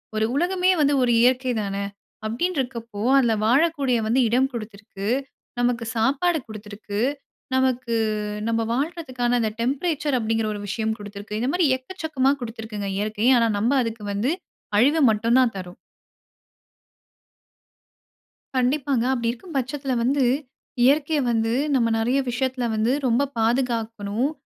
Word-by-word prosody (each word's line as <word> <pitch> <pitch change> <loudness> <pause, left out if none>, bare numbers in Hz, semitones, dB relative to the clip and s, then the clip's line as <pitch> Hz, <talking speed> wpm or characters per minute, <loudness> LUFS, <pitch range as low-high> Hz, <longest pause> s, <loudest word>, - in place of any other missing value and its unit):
ஒரு 215 - +2
உலகமே 365 +3 +2
வந்து 285 0 +3
ஒரு 240 - +2
இயற்கை 255 +1 +3
தான! 200 -1 -3 0.5
அப்டின்ருக்கப்போ 235 - -3 0.2
அதில 240 -4 +3
வாழக்கூடிய 275 0 +2
வந்து 240 +4 +2
இடம் 255 +4 +2
குடுத்திருக்கு, 210 -3 -7 0.5
நமக்கு 245 -1 +1
சாப்பாடு 285 +9 +2
குடுத்திருக்கு, 210 -1 -7 0.6
நமக்கு 255 -2 +1 0.5
நம்ப 230 0 +1
வாழ்றதுக்கான 260 -4 -1
அந்த 220 -2 0
டெம்பரேச்சர் 285 +2 0
அப்டிங்கிற 225 -1 0
ஒரு 205 - -6
விஷயம் 220 +2 -1
குடுத்திருக்கு. 205 +1 -6
இந்த 245 +4 0
மாரி 355 -2 +3
எக்கச்சக்கமா 275 -2 -1
குடுத்துருக்குங்க 220 -3 -5
இயற்கை. 215 +3 -1
ஆனா 230 - +3
நம்ப 240 +6 +2
அதுக்கு 225 -2 -5
வந்து 220 +9 0 0.5
அழிவ 290 +8 +4
மட்டும் 230 +4 +2
தான் 250 -3 +3
தர்றோம். 180 -1 -8 2.8
கண்டிப்பாங்க. 260 -1 +1
அப்டி 235 -3 -1
இருக்கும் 285 +6 -11
பட்சத்தில 270 +1 -2
வந்து, 270 +2 +2 0.6
இயற்கைய 295 +3 +3
வந்து 225 0 +1 0.2
நம்ம 235 -3 +3
நிறைய 245 +5 +1
விஷயத்தில 250 0 -1
வந்து 220 +3 +1 0.2
ரொம்ப 255 +4 +2
பாதுகாக்கணும். 230 0 0
245 Hz, 125 wpm, -23 LUFS, 220-270 Hz, 2.8 s, அழிவ